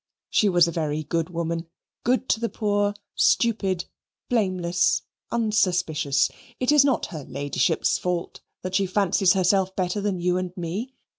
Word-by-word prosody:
She 210 Hz, -, +3 dB
was 175 Hz, -2 st, +5 dB
a -, -, -2 dB
very 155 Hz, -2 st, -2 dB
good 165 Hz, +2 st, -1 dB
woman: 170 Hz, -1 st, -3 dB, 0.4 s
good 255 Hz, +2 st, +1 dB
to -, -, +2 dB
the 230 Hz, 0 st, -1 dB
poor; 205 Hz, -1 st, 0 dB, 0.2 s
stupid, 195 Hz, -6 st, +2 dB, 0.4 s
blameless, 185 Hz, -6 st, +1 dB, 0.3 s
unsuspicious. 180 Hz, -10 st, +1 dB, 0.3 s
It 255 Hz, +2 st, +2 dB
is 295 Hz, -2 st, +6 dB
not 275 Hz, -4 st, +1 dB
her 155 Hz, -3 st, -6 dB
ladyship's 145 Hz, +4 st, 0 dB
fault 180 Hz, -1 st, -3 dB, 0.2 s
that 185 Hz, 0 st, -4 dB
she 195 Hz, 0 st, +2 dB
fancies 195 Hz, -1 st, +3 dB
herself 190 Hz, 0 st, +2 dB
better 185 Hz, +2 st, -1 dB
than 200 Hz, -3 st, -1 dB
you 180 Hz, +1 st, +1 dB
and 185 Hz, 0 st, -4 dB
me. 195 Hz, +10 st, -4 dB
185 Hz, 150 wpm, -24 LUFS, 170-210 Hz, 0.4 s, is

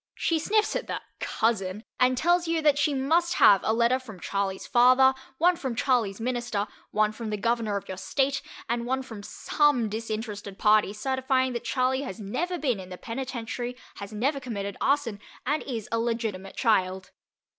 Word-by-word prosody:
She 330 Hz, -2 st, +1 dB
sniffs 425 Hz, +6 st, +1 dB
at -, -, -2 dB
the -, -, -3 dB, 0.2 s
"cousin" 210 Hz, -2 st, -1 dB, 0.2 s
and 255 Hz, 0 st, +4 dB
tell's 345 Hz, +4 st, +2 dB
you 330 Hz, 0 st, +1 dB
that 295 Hz, -2 st, +4 dB
she 295 Hz, +1 st, +3 dB
must 330 Hz, +6 st, +2 dB
have 200 Hz, -2 st, +7 dB
a -, -, +1 dB
letter 235 Hz, +3 st, +3 dB
from 220 Hz, -8 st, -11 dB
Charley's 195 Hz, +2 st, -2 dB
father, 255 Hz, +2 st, +6 dB, 0.2 s
one 350 Hz, +4 st, +4 dB
from 260 Hz, -7 st, -4 dB
Charley's 230 Hz, -6 st, +1 dB
minister, 240 Hz, -4 st, -1 dB, 0.2 s
one 215 Hz, 0 st, +2 dB
from 220 Hz, 0 st, -6 dB
the 210 Hz, -, -2 dB
governor 230 Hz, -1 st, 0 dB
of 200 Hz, -, -7 dB
your 190 Hz, -, -6 dB
state, 275 Hz, +6 st, 0 dB, 0.3 s
and 235 Hz, 0 st, -1 dB
one 265 Hz, +1 st, 0 dB
from 225 Hz, -5 st, -9 dB
some 250 Hz, +1 st, +1 dB
disinterested 215 Hz, -2 st, -5 dB
party 210 Hz, -1 st, +4 dB
certifying 260 Hz, +3 st, 0 dB
that 235 Hz, -, -4 dB
Charley 260 Hz, 0 st, +1 dB
has 255 Hz, -9 st, -6 dB
never 315 Hz, -, -2 dB
been 255 Hz, -, 0 dB
in 185 Hz, -1 st, -9 dB
the 180 Hz, -, -7 dB
penitentiary, 245 Hz, +1 st, -5 dB, 0.2 s
has 200 Hz, +1 st, -7 dB
never 265 Hz, +7 st, 0 dB
committed 200 Hz, -6 st, -4 dB
arson, 275 Hz, -7 st, +1 dB, 0.3 s
and 295 Hz, +3 st, +1 dB
is 230 Hz, -6 st, -5 dB
a 230 Hz, -, +1 dB
legitimate 225 Hz, -5 st, -2 dB
child. 190 Hz, -5 st, +1 dB
235 Hz, 175 wpm, -27 LUFS, 210-265 Hz, 0.3 s, have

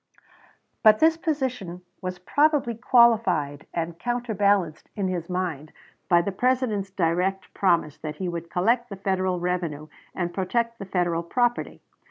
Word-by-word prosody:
But 215 Hz, -1 st, +7 dB
this 320 Hz, +4 st, +4 dB
position 255 Hz, -, -3 dB, 0.2 s
was 185 Hz, -1 st, -4 dB
probably 285 Hz, -, +2 dB
qualified 220 Hz, -, +3 dB
and 170 Hz, 0 st, -4 dB
counterbalanced 205 Hz, -8 st, 0 dB
in 195 Hz, -3 st, -1 dB
his 175 Hz, -2 st, -4 dB
mind 170 Hz, -5 st, -3 dB, 0.4 s
by 170 Hz, -1 st, +5 dB
the 200 Hz, -, -2 dB
President's 230 Hz, -2 st, 0 dB
direct 185 Hz, +1 st, -1 dB
promise 170 Hz, -6 st, +1 dB
that 155 Hz, -1 st, -5 dB
he 185 Hz, +3 st, -4 dB
would 170 Hz, -1 st, -5 dB
collect 235 Hz, +8 st, +1 dB
the 200 Hz, -, -6 dB
Federal 190 Hz, -2 st, -1 dB
revenue 170 Hz, -4 st, -3 dB, 0.3 s
and 175 Hz, -1 st, -2 dB
protect 230 Hz, +5 st, -1 dB
the 195 Hz, -, -6 dB
Federal 175 Hz, -3 st, 0 dB
property. 240 Hz, +7 st, -1 dB
190 Hz, 140 wpm, -25 LUFS, 170-235 Hz, 0.4 s, But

